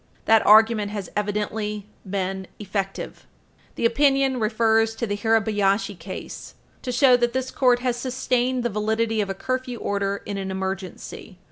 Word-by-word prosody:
That 225 Hz, -1 st, +5 dB
argument 215 Hz, -1 st, +6 dB
has 205 Hz, -3 st, -6 dB
evidently 210 Hz, 0 st, -2 dB, 0.2 s
been 190 Hz, -1 st, -3 dB
effective. 195 Hz, -1 st, -5 dB, 0.5 s
The -, -, -1 dB
opinion 270 Hz, +1 st, +3 dB
refers 225 Hz, 0 st, +2 dB
to 235 Hz, -, -2 dB
the 205 Hz, -2 st, -2 dB
Hirabayashi 205 Hz, -2 st, +1 dB
case, 185 Hz, +3 st, -8 dB
supra, -, -, -35 dB
to 255 Hz, -, -3 dB
show 250 Hz, 0 st, +5 dB
that 240 Hz, -1 st, 0 dB
this 260 Hz, 0 st, -2 dB
court 245 Hz, -2 st, +3 dB
has 245 Hz, -1 st, 0 dB
sustained 255 Hz, 0 st, 0 dB
the 240 Hz, -, 0 dB
validity 220 Hz, +1 st, 0 dB
of 200 Hz, -, -3 dB
a 195 Hz, -, -3 dB
curfew 255 Hz, +3 st, -3 dB
order 200 Hz, -1 st, -2 dB
in 200 Hz, -1 st, -4 dB
an 190 Hz, 0 st, -4 dB
emergency. 190 Hz, +1 st, -6 dB
220 Hz, 155 wpm, -24 LUFS, 200-245 Hz, 0.5 s, argument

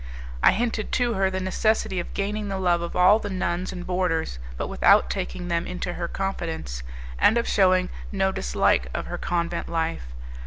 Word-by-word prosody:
I -, -, +6 dB
hinted 225 Hz, -1 st, -1 dB
to 245 Hz, -2 st, +2 dB
her 195 Hz, -2 st, +2 dB
the 190 Hz, 0 st, -2 dB
necessity 190 Hz, 0 st, 0 dB
of 175 Hz, -, -6 dB
gaining 205 Hz, +1 st, -2 dB
the 195 Hz, -1 st, -2 dB
love 175 Hz, -2 st, +2 dB
of 170 Hz, -, -5 dB
all 185 Hz, +4 st, +6 dB
the 205 Hz, -, -5 dB
nuns 185 Hz, -1 st, -2 dB
and 180 Hz, -1 st, -7 dB
boarders, 170 Hz, -, -1 dB, 0.2 s
but -, -, -2 dB
without 65 Hz, 0 st, +4 dB
taking 60 Hz, -, -4 dB
them 170 Hz, -1 st, -1 dB
into 180 Hz, -1 st, -4 dB
her 170 Hz, -1 st, -3 dB
confidence, 165 Hz, -, -4 dB, 0.4 s
and 225 Hz, -, +5 dB
of 235 Hz, -, 0 dB
shewing 185 Hz, -2 st, +3 dB, 0.2 s
no 190 Hz, -2 st, +1 dB
dislike -, -, +1 dB
of -, -, -2 dB
her -, -, -5 dB
convent 170 Hz, -1 st, -2 dB
life. 165 Hz, -, -2 dB
180 Hz, 185 wpm, -25 LUFS, 170-195 Hz, 0.4 s, I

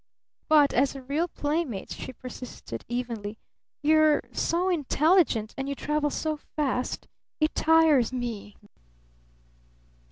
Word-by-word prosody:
"But 300 Hz, -2 st, +5 dB
as 270 Hz, +3 st, +2 dB
a 270 Hz, -, -8 dB
real 295 Hz, +6 st, 0 dB
playmate," 295 Hz, -, -2 dB
she -, -, -6 dB
persisted 250 Hz, -, -8 dB
evenly, 230 Hz, -3 st, -4 dB, 0.5 s
"you 310 Hz, +1 st, +5 dB
are 310 Hz, -1 st, +4 dB
so 350 Hz, +2 st, 0 dB
intelligent 310 Hz, -, +2 dB
and 270 Hz, +1 st, -4 dB
you 280 Hz, -, -2 dB
travel 300 Hz, +1 st, 0 dB
so 310 Hz, +1 st, -2 dB, 0.2 s
fast 270 Hz, -4 st, -1 dB, 0.3 s
it 310 Hz, 0 st, +2 dB
tires 315 Hz, -7 st, +4 dB
me." 235 Hz, -5 st, -5 dB
280 Hz, 120 wpm, -27 LUFS, 245-310 Hz, 0.5 s, But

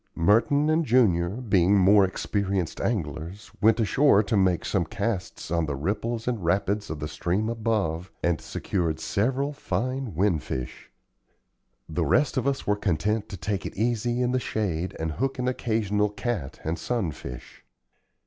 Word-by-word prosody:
Merton 115 Hz, -, +3 dB
and 160 Hz, +1 st, +3 dB
Junior, 105 Hz, -, +3 dB
being 100 Hz, -3 st, +2 dB
more 100 Hz, +2 st, +6 dB
experienced 95 Hz, -2 st, -2 dB
anglers, 85 Hz, -1 st, -3 dB
went 110 Hz, +2 st, +4 dB
ashore 115 Hz, 0 st, +4 dB
to 110 Hz, +2 st, -1 dB
make 95 Hz, -3 st, +2 dB
some 95 Hz, -4 st, +1 dB
casts 100 Hz, 0 st, -4 dB
on 85 Hz, -2 st, +1 dB
the 75 Hz, -, -2 dB
ripples 110 Hz, -, -2 dB
and 120 Hz, -6 st, -1 dB
rapids 100 Hz, +4 st, 0 dB
of 80 Hz, -, -4 dB
the 75 Hz, -, -3 dB
stream 90 Hz, +7 st, -1 dB
above, 105 Hz, -7 st, -1 dB
and 85 Hz, -2 st, +1 dB
secured 85 Hz, -5 st, -2 dB
several 130 Hz, -, 0 dB
fine 130 Hz, -4 st, -3 dB
"winfish." 80 Hz, -9 st, -2 dB, 1.0 s
The 80 Hz, +1 st, -1 dB
rest 135 Hz, -, +2 dB
of -, -, 0 dB
us 140 Hz, -1 st, -1 dB
were 105 Hz, -, +2 dB
content 105 Hz, +3 st, -1 dB
to 95 Hz, -, -6 dB
take 95 Hz, +3 st, -2 dB
it -, -, -7 dB
easy 120 Hz, +2 st, 0 dB
in 125 Hz, -, +1 dB
the 130 Hz, -, +1 dB
shade 95 Hz, -7 st, -2 dB
and 80 Hz, 0 st, -2 dB
hook 135 Hz, +11 st, -2 dB
an 125 Hz, 0 st, -1 dB
occasional 110 Hz, -4 st, 0 dB
cat 105 Hz, -, -4 dB
and 80 Hz, +2 st, -2 dB
sun 115 Hz, -10 st, -1 dB
fish. 60 Hz, -4 st, -10 dB
100 Hz, 160 wpm, -26 LUFS, 85-115 Hz, 1.0 s, more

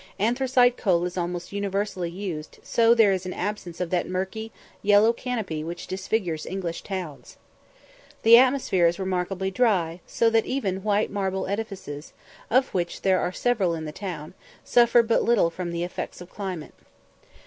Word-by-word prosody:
Anthracite 245 Hz, +2 st, +3 dB
coal 175 Hz, -5 st, +2 dB
is 180 Hz, -, -4 dB
almost 175 Hz, -1 st, -3 dB
universally 200 Hz, -3 st, -2 dB
used, 170 Hz, -4 st, -6 dB
so 230 Hz, 0 st, +4 dB
there 225 Hz, -4 st, +5 dB
is 185 Hz, -1 st, -2 dB
an 185 Hz, -, -4 dB
absence 185 Hz, -3 st, -4 dB
of 180 Hz, -2 st, -3 dB
that 180 Hz, -1 st, 0 dB
murky, 190 Hz, +5 st, -3 dB, 0.3 s
yellow 210 Hz, +3 st, +5 dB
canopy 220 Hz, -11 st, -3 dB
which 170 Hz, +2 st, -6 dB
disfigures 185 Hz, -4 st, -2 dB
English 180 Hz, -3 st, -4 dB
towns. 180 Hz, -7 st, -7 dB, 0.9 s
The 230 Hz, +1 st, +9 dB
atmosphere 250 Hz, -8 st, +4 dB
is 170 Hz, -, 0 dB
remarkably 190 Hz, 0 st, -2 dB
dry, 185 Hz, -6 st, +1 dB
so 230 Hz, -1 st, +2 dB
that 225 Hz, -1 st, +2 dB
even 195 Hz, -8 st, -1 dB
white 210 Hz, +1 st, +1 dB
marble 190 Hz, -1 st, -1 dB
edifices, 195 Hz, -8 st, -5 dB, 0.4 s
of 260 Hz, +3 st, +2 dB
which 175 Hz, -2 st, -2 dB
there 190 Hz, -1 st, +3 dB
are 180 Hz, -, -1 dB
several 195 Hz, -5 st, +1 dB
in 160 Hz, -1 st, -5 dB
the 150 Hz, -, -5 dB
town, 165 Hz, -4 st, -6 dB, 0.3 s
suffer 240 Hz, 0 st, +5 dB
but 230 Hz, 0 st, +2 dB
little 220 Hz, -8 st, +3 dB
from 175 Hz, +1 st, -5 dB
the 170 Hz, 0 st, -2 dB
effects 175 Hz, -, -5 dB
of 175 Hz, 0 st, -11 dB
climate. 185 Hz, -6 st, -6 dB
190 Hz, 160 wpm, -25 LUFS, 175-220 Hz, 0.9 s, The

